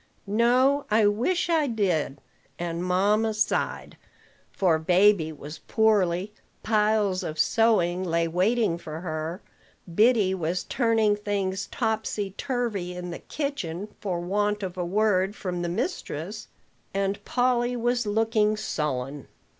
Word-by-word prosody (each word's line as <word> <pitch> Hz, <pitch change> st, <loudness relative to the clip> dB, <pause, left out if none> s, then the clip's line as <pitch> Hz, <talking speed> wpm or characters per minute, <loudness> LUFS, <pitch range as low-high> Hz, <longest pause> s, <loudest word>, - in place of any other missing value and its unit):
"No: 250 Hz, +7 st, +3 dB
I 215 Hz, 0 st, +4 dB
wish 240 Hz, -, +1 dB
I 320 Hz, -4 st, +2 dB
did." 180 Hz, -, 0 dB, 0.4 s
And 170 Hz, 0 st, -3 dB
mamma 205 Hz, +4 st, +2 dB
sighed; 215 Hz, -, -1 dB, 0.5 s
for 170 Hz, -5 st, +2 dB
baby 180 Hz, 0 st, +4 dB
was 150 Hz, +1 st, -9 dB
poorly, 205 Hz, -3 st, +1 dB, 0.3 s
piles 210 Hz, -3 st, +2 dB
of 155 Hz, -, -5 dB
sewing 185 Hz, -1 st, +2 dB
lay 170 Hz, -1 st, +1 dB
waiting 185 Hz, +2 st, +1 dB
for 155 Hz, -1 st, -7 dB
her, 160 Hz, +1 st, -4 dB, 0.5 s
Biddy 215 Hz, -1 st, +4 dB
was 175 Hz, 0 st, -2 dB
turning 225 Hz, -4 st, +2 dB
things 200 Hz, -2 st, -2 dB
topsy 220 Hz, -3 st, -2 dB
turvy 205 Hz, -6 st, -3 dB
in 180 Hz, 0 st, -6 dB
the -, -, -6 dB
kitchen 210 Hz, -, -4 dB
for 185 Hz, -4 st, -2 dB
want 205 Hz, +3 st, -1 dB
of 185 Hz, -1 st, -4 dB
a 180 Hz, -, -2 dB
word 195 Hz, +1 st, +1 dB
from 180 Hz, -3 st, -4 dB
the 175 Hz, -, -2 dB
mistress, 210 Hz, -, -4 dB, 0.5 s
and 195 Hz, 0 st, -1 dB
Polly 245 Hz, -1 st, +1 dB
was 240 Hz, -1 st, 0 dB
looking 215 Hz, 0 st, +2 dB
sullen. 140 Hz, -6 st, -3 dB
205 Hz, 125 wpm, -26 LUFS, 175-220 Hz, 0.5 s, I